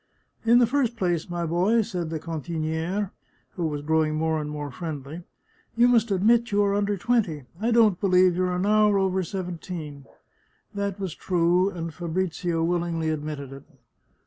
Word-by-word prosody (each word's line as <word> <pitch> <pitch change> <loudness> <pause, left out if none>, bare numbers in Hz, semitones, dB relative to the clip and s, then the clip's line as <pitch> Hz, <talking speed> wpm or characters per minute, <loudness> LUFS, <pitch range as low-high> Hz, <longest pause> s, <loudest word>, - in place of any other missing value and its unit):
" - - -39
In 240 - +8
the 245 - +6
first 245 -2 0
place, 175 -5 -1
my 175 -1 -2
boy," 185 +8 +2
said 175 -5 -4
the 160 -1 -3
cantinQre, 165 +4 -3 0.4
who 175 -5 -2
was 145 -2 -4
growing 155 0 +1
more 160 0 0
and 150 - -5
more 145 -1 -5
friendly, 150 +2 -6 0.3
" - - -37
you 240 +1 +6
must 235 -2 +3
admit 225 +5 +3
you 205 0 +3
are 200 0 +1
under 205 0 0
twenty 190 - 0
— 170 - -20
I 230 - +1
don't 225 -6 +4
believe 185 -2 +4
you 185 +1 +1
are 180 0 -1
an 180 +2 -1
hour 210 -1 +4
over 190 -1 +1
seventeen! 170 -6 -6 0.3
" - - -41
That 200 -1 -3
was 190 -5 -3
true, 180 +1 +2
and 165 -4 -6
Fabrizio 175 0 -2
willingly 170 -1 0
admitted 150 -3 -5
it. 135 +1 -11
175 Hz, 185 wpm, -25 LUFS, 160-200 Hz, 0.4 s, In